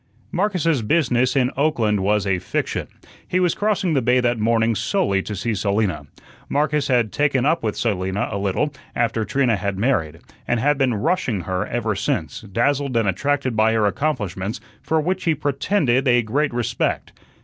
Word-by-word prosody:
Marcus's 175 - +1
business 125 0 +1
in 130 -1 +2
Oakland 120 -8 +1
was 105 +1 +1
a 95 -2 +1
fiction. - - -3 0.4
He 185 - +1
was 180 -2 +2
crossing 205 -5 0
the 135 - +2
bay 125 +1 +3
that 120 -2 +1
morning 115 +1 +2
solely 110 - 0
to 105 - -5
see 110 +4 -2
Selina. 100 -7 -1 0.4
Marcus 150 0 +1
had 120 -5 +2
"taken 135 -3 +1
up 165 +3 +2
with" 110 -2 -2
Selina 95 -3 -1
a 100 - -2
little 100 +10 -1 0.2
after 115 -1 0
Trina 120 0 +1
had 100 0 -3
married, 85 - 0 0.3
and 120 - +1
had 145 +3 +2
been 130 -4 +2
"rushing" 115 - 0
her 90 +1 -2
ever 115 -2 -1
since, 100 - -2
dazzled 125 +5 0
and 115 -3 +2
attracted 135 +5 0
by 110 +1 +3
her 110 -2 +2
accomplishments, 105 - -2 0.2
for 160 - 0
which 185 +4 -1
he 165 -2 +2
pretended 140 -2 +1
a 120 -1 +4
great 145 +7 0
respect. 120 -2 -2
120 Hz, 170 wpm, -21 LUFS, 105-145 Hz, 0.4 s, a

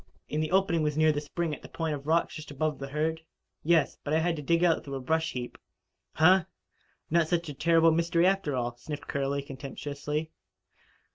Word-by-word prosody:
"And 150 - 0
the 155 - -1
opening 185 -3 +2
was 150 -1 0
near 155 0 +5
the 145 -1 -2
spring 160 +2 -3
at - - -7
the - - -11
point 160 -2 -2
of 140 0 -6
rocks 165 +1 +2
just 155 0 -8
above 150 +1 -2
the 135 - -5
herd?" 155 +3 -1 0.4
"Yes. 160 -3 +2
But 150 +1 0
I - - +4
had 170 +1 +1
to - - -4
dig 170 +4 +2
out 170 -2 +3
through 140 -1 -6
a - - -3
brush 160 +5 0
heap." 125 -1 -6 0.5
"Huh! 180 +2 +5 0.7
Not 165 -1 +3
such 170 -1 -1
a - - -5
terrible 165 +3 +4
mystery, 170 +1 +2
after 190 -7 +1
all," 120 -1 -2
sniffed 150 +4 -7
Curley 140 0 -1
contemptuously. 145 +3 -5
155 Hz, 205 wpm, -29 LUFS, 145-165 Hz, 0.7 s, near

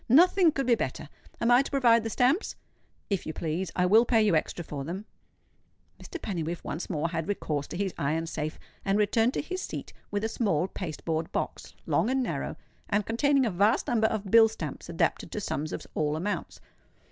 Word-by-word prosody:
Nothing 345 - +6
could 275 -2 -2
be 245 - +4
better. 145 - -2 0.3
Am 235 - +2
I 245 +2 +7
to 275 - -5
provide 240 -4 +4
the 225 - -2
stamps?" 260 - +1 0.6
"If 195 - -1
you 160 - -3
please. 165 +3 -3
I 180 - +2
will 215 +5 +6
pay 235 -1 +3
you 210 -5 +4
extra 165 +2 -1
for 140 -3 -5
them." 180 +8 -5 1.0
Mr. 355 - -7
Pennywhiffe 170 - -3
once 155 +5 -5
more 165 -1 -1
had 165 -1 -3
recourse 150 -8 -2
to - - -6
his 195 -1 -1
iron 155 +4 0
safe, 155 -2 -4 0.3
and 195 0 +1
returned 225 +4 +2
to - - -1
his 370 +4 -4
seat - - -6 0.2
with 205 0 -2
a - - +2
small 195 -8 0
paste 165 -6 -6
board 160 0 -1
box, - - -4
long - - +2
and 265 0 +1
narrow, - - -3 0.3
and 205 0 +1
containing 275 +4 +2
a 225 - 0
vast 200 +5 +3
number 220 -2 +2
of 210 -3 -3
bill 225 -1 +8
stamps 170 -9 -6
adapted 165 0 0
to - - -2
sums 155 -6 -3
of - - -5
all 150 -1 0
amounts. 195 +6 -3
200 Hz, 205 wpm, -28 LUFS, 165-235 Hz, 1.0 s, bill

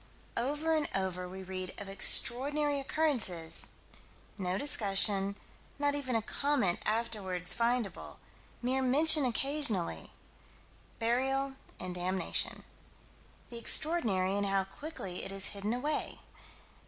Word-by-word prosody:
Over 295 +6 -2
and 310 -2 -1
over 180 -1 -3
we 190 +1 -9
read 185 0 -7
of 200 - -7
extraordinary 280 +8 +4
occurrences 245 - +2 0.7
no 185 -2 -3
discussion; 200 -6 +3 0.4
not 285 0 0
even 270 -4 -3
a 225 - 0
comment 265 -10 -1
afterward 210 -5 -3
findable; 235 +1 -1 0.5
mere 260 +2 -1
mention 290 +3 +6
occasionally 250 - 0 0.9
burial 265 +4 -1 0.3
and 185 -1 -5
damnation. 185 +1 -2 0.9
The 235 - -5
extraordinary 220 - +3
and 205 0 -1
how 195 0 +1
quickly 195 - -6
it - - -5
is 195 -1 0
hidden 200 +1 -4
away. 290 +5 -3
230 Hz, 110 wpm, -30 LUFS, 190-280 Hz, 0.9 s, mention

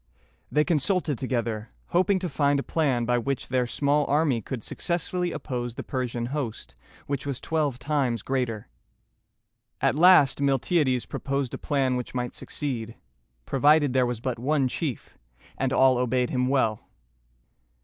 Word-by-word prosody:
They 150 - +3
consulted 165 - 0
together, 115 -4 -2 0.2
hoping 185 +3 +3
to 185 -1 -3
find 140 -2 +1
a - - -2
plan 135 -7 0
by 120 0 +2
which 135 +2 -3
their 125 -1 +1
small 145 +3 +1
army 145 -5 +2
could 115 +1 -6
successfully 175 0 -2
oppose 120 -6 -4
the - - -5
Persian 125 -3 -3
host, 125 - -4 0.3
which 140 0 -3
was 135 -3 -3
twelve 150 -5 -1
times 130 -4 -1
greater. 125 -5 -2 1.1
At - - +2
last 150 -4 +6
Miltiades 135 -1 +1
proposed 140 -2 -3
a - - -5
plan 135 -3 0
which 125 0 -6
might 125 -1 -2
succeed, 115 -6 -4 0.5
provided 145 0 +3
there 130 -1 +3
was 120 -2 -3
but 125 -2 -3
one 140 +1 +1
chief, 135 0 -4 0.4
and 135 -1 -1
all 130 -2 +4
obeyed 125 0 0
him 125 -1 +1
well. 120 -6 0
135 Hz, 150 wpm, -26 LUFS, 125-150 Hz, 1.1 s, last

